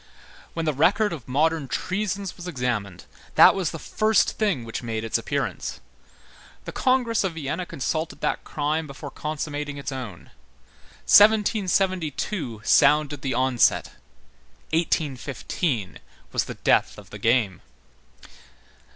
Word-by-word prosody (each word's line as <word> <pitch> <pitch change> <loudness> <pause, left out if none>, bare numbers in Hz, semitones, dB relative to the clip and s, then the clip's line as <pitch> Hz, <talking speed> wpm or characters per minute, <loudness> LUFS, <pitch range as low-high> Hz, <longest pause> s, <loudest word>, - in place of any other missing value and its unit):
When 165 -1 -2
the 155 - +1
record 190 +8 +2
of 140 -9 -8
modern 155 +2 +1
treasons 195 +5 -3
was 180 - -9
examined, 120 - -3 0.3
that - - +8
was 190 -4 -1
the 165 - -6
first 215 +6 +2
thing 200 - 0
which 115 - -5
made 115 -2 -3
its 115 - 0
appearance. - - -3 0.9
The - - -5
congress 250 -4 +1
of 190 -3 -1
Vienna 165 +4 -3
consulted 155 +4 -3
that - - -1
crime 155 +2 -2
before 140 0 -8
consummating 150 -1 -4
its 140 +1 -5
own. 120 -10 -7 0.7
1772 190 - +3
sounded 145 +2 +4
the 130 -3 -2
onset; 130 -1 +2 0.8
1815 145 - -1 0.3
was - - 0
the - - -7
death - - +2
of - - -13
the - - -8
game. 115 -6 +1
150 Hz, 125 wpm, -24 LUFS, 130-185 Hz, 0.9 s, that